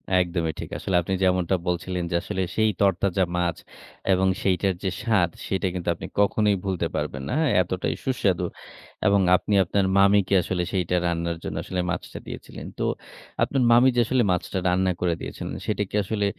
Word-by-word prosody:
একদমই 85 -3 +1
ঠিক। - - -6
আসলে 95 - -2
আপনি 90 +3 -3
যেমনটা 90 0 +2
বলছিলেন 90 +1 -1
যে - - 0
আসলে 95 - -3
সেই 110 0 +3
তরতাজা 95 -1 +2
মাছ, 85 -1 0 0.6
এবং 95 +1 +2 0.2
সেইটার 95 0 +2
যে 95 - +1
স্বাদ 105 -7 +2 0.2
সেটা 95 0 0
কিন্তু 90 -1 -3
আপনি - - -7
কখনোই 105 0 +3
ভুলতে 95 -3 -1
পারবেন 70 -1 -3
না। - - -1
হ্যাঁ? 160 -5 +2
এতটাই 90 +1 -2
সুস্বাদু 95 -9 +1 0.6
এবং 100 -1 +4
আপনি 105 - -1
আপনার 95 +2 0
মামিকে 100 0 +4
আসলে 90 0 -2
সেইটা 90 -2 0
রান্নার 85 0 -1
জন্য - - -4
আসলে 90 -1 -2
মাছটা 90 - -5
দিয়েছিলেন। - - -8
তো - - 0 0.6
আপনার 135 -2 +1
মামি 120 +2 +6
যে - - +3
আসলে 130 0 +2
মাছটা 90 +1 -1
রান্না 95 +1 +2
করে 90 -2 +2
দিয়েছিলেন, - - -6
সেটা 105 -1 0
কি - - -6
আসলে 105 +1 -1
95 Hz, 175 wpm, -25 LUFS, 90-100 Hz, 0.6 s, মামি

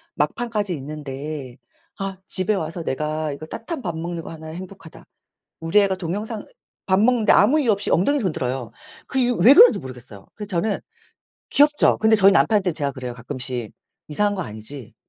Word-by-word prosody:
막판까지 215 -5 -1
있는데 140 -2 -7 0.4
'아 195 -1 -4
집에 190 +3 +3
와서 165 -2 -4
내가 155 +2 -2
이거 150 +2 -8
따뜻한 265 - -6
밥 170 -6 -4
먹는 170 0 -5
거 - - -9
하나 160 -1 -10
행복하다.' 175 0 -10 0.6
우리 165 +6 +3
애가 195 -2 +2
동영상 205 +5 -4 0.4
밥 190 0 +3
먹는데 225 -1 +4
아무 255 +10 +5
이유 250 -6 +2
없이 200 0 -2
엉덩이를 265 - +2
흔들어요. 130 -7 -3 0.3
그 265 - -3
이유 245 -1 +2
왜 260 +5 +7
그런지 465 +7 +8
모르겠어요. 125 -6 -11
그래서 210 -2 -8
저는 195 +2 -1 0.7
귀엽죠. 295 +1 +4
근데 220 0 +4
저희 195 -1 +6
남편한테 200 -2 +3
제가 145 -3 -1
그래요. 125 -2 -6
가끔씩 125 -1 -5 0.4
"이상한 205 +7 0
거 185 - -3
아니지? 110 +1 -7
175 Hz, 385 characters per minute, -22 LUFS, 145-210 Hz, 0.7 s, 그런지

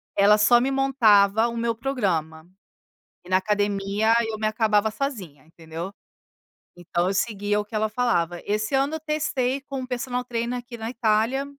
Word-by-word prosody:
ela 205 +1 +5
só 225 +3 +5
me 270 +2 0
montava 225 -6 +4
o 235 0 -5
meu 230 0 -1
programa, 175 - -2 0.8
e - - -13
na 185 - +4
academia 205 +2 0
eu 220 -1 -4
me 215 - -3
acabava 215 -1 +1
sozinha 200 - -5
entendeu, 165 +2 -8 0.8
então 175 0 -2
eu 190 - 0
seguia 205 0 -1
o 210 - -3
que 215 - -9
ela, 215 0 0
falava 180 -8 0
esse 215 +3 -2
ano 280 +4 0
testei 290 -4 -1
com 270 -1 -6
um - - -5
personal 250 0 -3
treiner 240 0 -3
aqui 240 -1 -10
na 225 0 -5
Itália 230 +3 +1
220 Hz, 165 wpm, -24 LUFS, 200-250 Hz, 0.8 s, ela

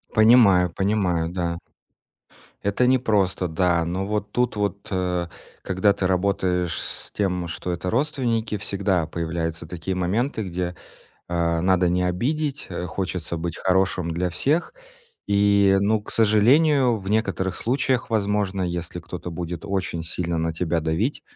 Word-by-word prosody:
Понимаю, 110 -5 +6
понимаю, 95 -4 0
да. 85 -2 -2 1.0
Это 100 +5 +1
непросто, 105 -8 +2
да. 85 0 +1
Но 90 +3 -2
вот 105 0 -2
тут 125 0 0
вот, 100 -1 -2
э, 90 -2 -1 0.4
когда 95 +2 +2
ты 95 - -2
работаешь 90 -2 0
с - - -5
тем, 90 -4 -1
что 85 +1 -4
это 90 +1 -3
родственники, 115 -4 0
всегда 100 -4 0
появляются 80 0 -3
такие 90 +3 -4
моменты, 110 +7 -1
где, 90 0 -3 0.5
э, 85 -1 0
надо 90 0 +3
не 90 +1 +1
обидеть, 140 - -1
э, 90 - -4
хочется 90 -2 -3
быть 85 0 -4
хорошим 95 -2 +1
для 90 +2 -1
всех. 145 - 0 0.5
И, 100 -1 +4
ну, 105 +2 +2
к - - -9
сожалению, 125 +5 +4
в 95 +1 -6
некоторых 100 -4 0
случаях, 130 0 0
возможно, 100 -3 0
если 85 0 -3
кто-то 90 +1 -7
будет 85 +1 -5
очень 90 -4 -2
сильно 85 +1 -3
на 80 0 -1
тебя 85 0 0
давить, 80 - -1
95 Hz, 140 wpm, -23 LUFS, 85-105 Hz, 1.0 s, Понимаю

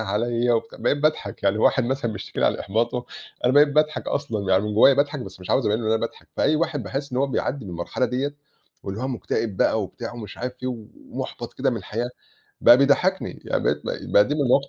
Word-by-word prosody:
عليَّ 115 +3 0
و 115 - +2 0.2
بقيت - - +1
باضحَك 150 -9 -1
يعني 100 +2 +2
واحد 125 +3 +3
مثلًا 125 -2 -1
بيشتكي 100 - -6
لي - - +4
على - - 0
إحباطه 120 +4 -1 0.4
أنا 125 - +4
بقيت 145 +2 +6
باضحك 150 +1 +1
أصلًا 110 -9 -2
يعني 95 +1 +4
من 105 0 -3
جوايا 135 +6 +7
باضحك 145 +1 0
بس 95 -5 -9
مش 90 - -6
عاوز 130 - +2
أبيّن 105 +1 +2
له 110 - -3
إن - - +1
أنا 110 - +1
باضحك 115 - -6
فأي 155 - +3
واحد 150 -4 -1
باحس 140 +2 -4
إن 125 - 0
هو 140 - +2
بيعدي 135 -1 -2
بالمرحلة 90 +7 -2
ديّة 135 +3 -2 0.5
واللي 100 +2 -5
هو 130 - -1
مكتئب 115 -4 -2
بقى 110 - +2
وبتاع 115 +4 -6
ومش 110 -4 -9
عارف 125 +1 -3
فيه 130 - -4
ومُحبَط 115 -4 -6
كده - - +1
من - - -2
الحياة 120 +3 -3 0.5
بقى 120 - +8
بيضحكني 140 0 +2
يعني - - -1
بقيت - - +1
ب - - -5
بقى 100 - +7
دي 145 - 0
من 150 - -1
المواقف 140 +1 +3
120 Hz, 230 wpm, -24 LUFS, 110-140 Hz, 0.5 s, بقى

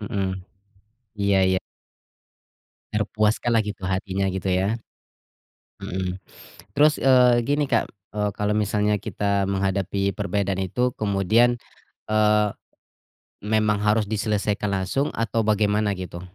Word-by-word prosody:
Heeh. 100 -3 -2 0.8
Iya 100 -1 +2
ya. 95 - 0 1.3
Terpuaskanlah 110 +2 +1
gitu 100 -2 -6
hatinya, 95 0 -1
gitu 95 0 -4
ya? 95 +5 +1 1.0
Hmm. 90 0 -3 0.6
Terus, 150 +1 +4
eee, 125 -2 +5
gini 145 +1 +2
Kak, - - +2 0.2
e 105 - -6 0.2
kalau 105 0 -1
misalnya 105 0 +1
kita 100 -1 -1
menghadapi 100 0 0
perbedaan 100 -1 -2
itu 125 +7 0
kemudian, 110 +4 +3 0.5
eee, 105 -1 +3 1.0
memang 105 -1 +2
harus 105 0 +2
diselesaikan 105 -1 -1
langsung 100 +9 0
atau 115 0 0
bagaimana, 105 -1 +2
gitu? 90 -1 -7
105 Hz, 105 wpm, -24 LUFS, 100-110 Hz, 1.3 s, eee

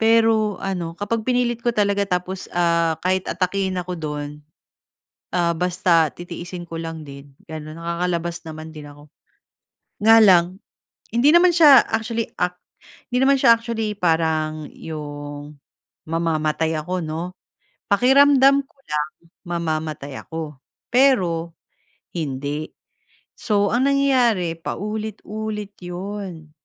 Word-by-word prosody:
Pero 225 -2 +3
ano, 175 -3 -3
kapag 220 +2 -2
pinilit 245 -2 +1
ko 240 - +1
talaga 200 -1 +1
tapos, 180 +1 -2
ah, 170 -2 +2
kahit 185 0 0
atakihin 185 +1 -1
ako 180 0 -3
dun, 150 -1 -4 1.1
ah, 170 -1 +2
basta 170 -2 +2
titiisin 175 +1 -8
ko 165 0 -6
lang 165 -1 -6
din 140 -1 -12
gano'n. 155 0 -8
Nakakalabas 170 0 -2
naman 155 0 -8
din 150 -2 -10
ako, 145 +1 -16 0.9
nga 225 +1 +8
lang 185 -2 +5 0.6
hindi 275 +6 +5
naman 345 0 +5
siya 295 -6 +8
actually, 225 +1 -2
ac 180 0 -1 0.5
hindi 250 +1 +1
naman 275 0 +5
siya 235 -3 +7
actually 225 -2 -3
parang 160 -4 0
'yong 145 -1 -7 0.5
mamamatay 160 -1 0
ako, 180 +3 -2
'no. 165 +3 -4 0.6
Pakiramdam 275 +4 +5
ko - - -34
lang 150 0 -2 0.4
mamamatay 155 -5 -3
ako, 155 -4 -7 0.3
pero 180 -11 +2 0.6
hindi. 145 0 -3 0.7
So, 205 -2 +1
ang 255 +3 +3
nangyayari, 245 -11 +2
paulit-ulit 210 +1 -5
'yon. 180 -3 -7
180 Hz, 115 wpm, -22 LUFS, 160-220 Hz, 1.1 s, nga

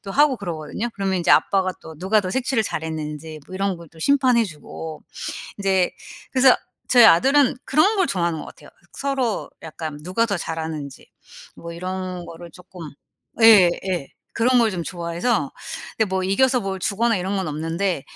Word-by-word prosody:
도 195 - -7
하고 285 +1 +4
그러거든요. 175 +2 -4
그러면 195 -1 -1
인제 175 - +1
아빠가 190 -1 +3
또 160 -1 -11
누가 195 +5 +2
더 185 -2 -4
색칠을 260 0 0
잘했는지 155 -2 -5
뭐 185 - -10
이런 195 -1 -1
걸 170 -1 -13
또 165 - -18
심판해 255 - +3
주고. 160 -2 -8 0.6
인제 190 -2 +1 0.4
그래서 260 -1 +6 0.3
저희 245 -2 +7
아들은 270 +10 +5
그런 345 +10 +3
걸 380 -3 +3
좋아하는 170 - -1
것 - - -7
같아요. - - -14 0.2
서로 270 -6 -2
약간 155 -2 -6
누가 185 +6 +1
더 200 -3 -1
잘하는지 160 -4 -6 0.5
뭐 170 0 -8
이런 185 0 -5
거를 170 0 -10
쪼끔 180 -3 -11 0.5
예. 210 -6 +8 0.2
예. 170 -7 -2 0.3
그런 250 +2 +3
걸 230 -2 +3
좀 180 -4 -3
좋아해서 170 - -2 0.5
근데 220 - +3
뭐 190 0 -1
이겨서 250 +6 +2
뭘 195 -1 -4
주거나 225 +4 +1
이런 190 +2 -2
건 190 -4 -2
없는데 165 +2 -2
185 Hz, 335 characters per minute, -22 LUFS, 165-230 Hz, 0.6 s, 예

